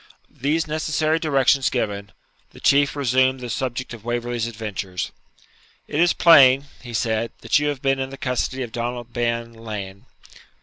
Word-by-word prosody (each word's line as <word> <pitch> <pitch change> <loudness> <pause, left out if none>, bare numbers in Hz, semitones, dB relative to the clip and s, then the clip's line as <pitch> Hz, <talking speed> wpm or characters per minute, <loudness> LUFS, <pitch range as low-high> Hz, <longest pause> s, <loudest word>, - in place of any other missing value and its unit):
These 155 +4 +1
necessary 155 0 0
directions 140 -3 +3
given, 100 -5 -3 0.4
the - - -13
Chieftain 140 +1 +3
resumed 130 -1 +2
the 125 -2 -6
subject 130 0 -3
of 115 -3 -10
Waverley's 120 0 -2
adventures. 105 -5 -5 0.8
'It 150 - -2
is 175 +1 +5
plain,' 140 -5 +6 0.2
he 120 - -9
said,'that 115 +4 0
you 150 - 0
have 145 -3 -3
been 135 0 +2
in 135 0 -2
the 135 - -9
custody 130 0 -2
of 120 - -7
Donald 120 0 -4
Bean 115 -1 -1
Lean. 105 -4 -8
125 Hz, 150 wpm, -22 LUFS, 115-140 Hz, 0.8 s, plain